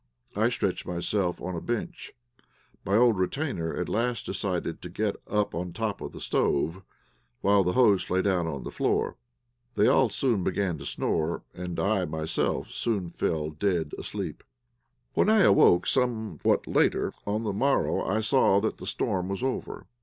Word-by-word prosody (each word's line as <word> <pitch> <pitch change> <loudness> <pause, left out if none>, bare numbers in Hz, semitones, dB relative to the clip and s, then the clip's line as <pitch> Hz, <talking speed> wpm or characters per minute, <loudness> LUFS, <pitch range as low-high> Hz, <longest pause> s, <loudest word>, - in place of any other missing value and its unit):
I - - +3
stretched - - -2
myself 90 +1 -1
on 90 +1 -4
a 85 - -4
bench. 165 +9 -4 0.7
My 100 0 +1
old 115 -3 +4
retainer 95 - -2
at - - -2
last 120 +2 -1
decided 90 -4 -3
to 90 - -7
get 105 +3 -1
up 105 -1 0
on 85 +3 -3
the 85 - -10
top 110 -3 -3
of - - -5
the - - -10
stove, 80 +6 0 0.6
while 100 0 +4
the 90 0 0
host 105 -7 +4
lay 95 +1 +1
down 90 -4 +1
on 70 -5 -4
the - - -6
floor. - - 0 0.6
They - - +4
all - - +4
soon 115 -8 0
began 90 -4 -1
to 70 - -7
snore, 80 +1 -1
and 90 -1 -5
I 100 -2 +1
myself 80 0 -2
soon 100 -7 -1
fell 80 -2 -2
dead 85 -1 -1
asleep. - - -5 0.7
When - - +3
I 215 -2 +5
awoke, 95 - +5
somewhat 110 - 0
late, - - +3 0.3
on 105 +2 -1
the 105 -3 -1
morrow 135 +7 +1
I 110 +3 0
saw 110 -3 +4
that 110 +2 -2
the - - -8
storm 90 0 -1
was 100 +5 -3
over. 130 -1 -3
95 Hz, 170 wpm, -27 LUFS, 85-110 Hz, 0.7 s, I